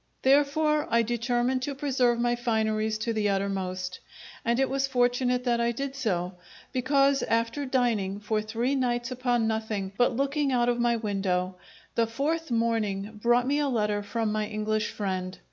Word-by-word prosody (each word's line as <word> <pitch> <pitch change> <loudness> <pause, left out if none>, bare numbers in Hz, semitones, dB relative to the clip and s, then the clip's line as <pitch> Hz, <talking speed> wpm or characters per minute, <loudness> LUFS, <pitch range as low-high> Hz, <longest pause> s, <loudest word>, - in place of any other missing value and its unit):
Therefore 295 +2 +3
I 235 0 +3
determined 240 +2 0
to 280 +2 -3
preserve 255 -4 +1
my 240 0 +2
fineries 220 -2 0
to 230 +1 -1
the 210 -2 +1
uttermost; 185 -2 -2 0.4
and 235 +2 +1
it 270 - +3
was 275 0 0
fortunate 250 -1 +1
that 240 -2 +1
I 235 0 +2
did 275 +3 -4
so; 185 -8 -1 0.4
because, 275 +2 +3
after 230 +5 0
dining, 225 -7 0
for 215 +1 -1
three 230 +5 -1
nights 240 -2 0
upon 245 -2 +1
nothing 220 -3 -2
but 245 -1 +3
looking 280 +2 0
out 240 -1 +2
of 240 0 0
my 240 0 +3
window, 195 -4 -1 0.4
the 230 -1 +2
fourth 305 +7 -2
morning 220 -3 -1
brought 240 +1 +3
me 285 +3 +1
a 290 -1 +1
letter 210 -4 0
from 215 +2 -2
my 215 0 -1
English 215 0 -1
friend. 185 -2 -3
235 Hz, 165 wpm, -27 LUFS, 215-255 Hz, 0.4 s, Therefore